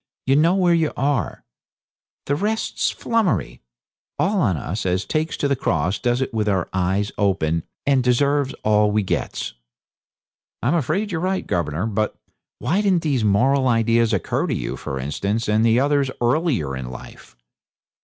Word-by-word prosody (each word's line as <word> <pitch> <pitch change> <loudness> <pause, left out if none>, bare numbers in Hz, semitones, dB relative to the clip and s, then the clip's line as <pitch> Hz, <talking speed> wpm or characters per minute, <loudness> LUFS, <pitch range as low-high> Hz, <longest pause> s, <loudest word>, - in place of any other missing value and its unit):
You 135 - +3
know 165 +5 +4
where 180 -3 +3
you 165 -2 +2
are. 135 - -1 0.8
The 145 - 0
rest's 215 +7 -1
flummery. 150 - -1 0.6
All 195 0 +1
on 95 - +2
us 95 +8 -4
as 90 0 0
takes 155 +1 -1
to 145 - 0
the 140 - +1
cross 90 - 0
does 120 +5 0
it 130 - -6
with 105 -2 0
our 95 -4 0
eyes 95 +3 0
open, 85 -5 +1 0.2
and 135 -2 +3
deserves 140 +2 +2
all 105 0 +3
we 105 0 +1
gets.' 95 - -3 1.1
'I'm 125 - +2
afraid 170 - 0
you're 160 -2 -2
right, 190 +1 -1
governor; 85 +2 -1
but 110 -1 -1 0.4
why 165 +12 0
didn't 190 -5 +2
these 140 -7 +1
moral 130 +7 +3
ideas 115 -1 +3
occur - - 0
to - - -1
you, - - -3
for 65 - -5
instance, 100 - -2
and 110 +2 +3
others 140 0 +2
earlier 120 - +1
in 65 -1 -5
life?' 60 -1 -12
120 Hz, 160 wpm, -22 LUFS, 100-150 Hz, 1.1 s, know